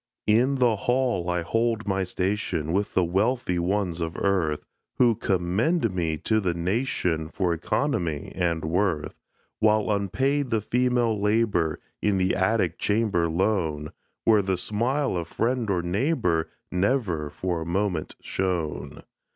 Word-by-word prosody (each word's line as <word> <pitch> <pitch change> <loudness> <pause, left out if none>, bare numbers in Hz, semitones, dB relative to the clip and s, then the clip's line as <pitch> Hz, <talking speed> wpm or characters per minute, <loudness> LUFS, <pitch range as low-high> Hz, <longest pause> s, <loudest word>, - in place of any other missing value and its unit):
In 120 +6 +3
the 125 -4 +3
hall 120 -6 0
I 90 -1 0
hold 115 +3 0
my 95 -1 +1
station, 90 -4 -1
With 100 +2 -1
the 95 - +4
wealthy 95 +2 +1
ones 90 -1 -1
of 80 0 -3
earth, 85 -7 0 0.3
Who 120 -2 +4
commend 100 - 0
me 80 -3 -1
to 110 +7 +1
the 90 -5 -1
nation 90 -4 -1
For 90 +1 0
economy 85 - -1
and 85 -3 -1
worth, 85 -2 0 0.5
While 110 0 +3
unpaid 130 +8 0
the 115 -2 +1
female 120 -1 +1
labor, 105 -7 +1 0.2
In 105 -2 +2
the 95 0 +1
attic 105 +4 +1
chamber 105 -6 +1
lone, 80 -4 0 0.3
Where 110 -2 +5
the 95 -1 -1
smile 120 +8 0
of 85 -2 -3
friend 120 +3 -1
or 90 -3 +1
neighbor 90 - 0 0.2
Never 90 - 0
for 85 +2 -3
a - - -4
moment 90 -2 -1
shone. 80 -7 -3
95 Hz, 140 wpm, -26 LUFS, 85-115 Hz, 0.5 s, Where